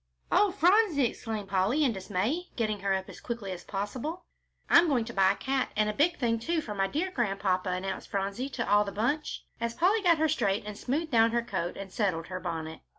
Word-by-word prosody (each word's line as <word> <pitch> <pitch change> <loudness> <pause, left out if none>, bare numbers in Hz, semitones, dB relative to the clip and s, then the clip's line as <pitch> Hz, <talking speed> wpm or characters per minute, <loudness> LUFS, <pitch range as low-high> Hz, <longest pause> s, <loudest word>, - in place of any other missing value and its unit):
"Oh, 410 +1 +5
Phronsie!" 365 - +4
exclaimed 220 -3 -4
Polly, 200 +10 +2
in 255 -5 +2
dismay, 215 - -2
getting 215 -3 -1
her 195 0 -1
up 190 0 -4
as - - -11
quickly 230 -5 -4
as 180 -1 -6
possible. 255 - -4 0.4
"I'm 340 0 +6
going 255 -7 +1
to 235 - -7
buy 195 -1 +4
a - - -11
cat 265 +4 -1
and 210 0 +2
a - - -9
big 315 +9 +2
thing, 230 -3 +1
too, 330 +8 0
for 230 -9 -5
my 195 -1 +1
dear 330 - -2
Grandpapa," 195 - 0
announced 185 +1 -3
Phronsie 200 +6 -2
to 235 -4 -3
all 205 +1 +5
the 200 - -5
bunch, 250 +10 -2
as 235 0 -2
Polly 395 +6 +3
got 345 -4 +4
her 315 +1 +2
straight 205 -10 0
and 210 0 -6
smoothed 295 +9 -2
down 230 -1 +4
her 235 0 +1
coat 180 -6 -3
and 195 -1 -8
settled 175 -6 -1
her 185 0 -4
bonnet. 160 -3 -5
225 Hz, 220 wpm, -29 LUFS, 195-290 Hz, 0.4 s, I'm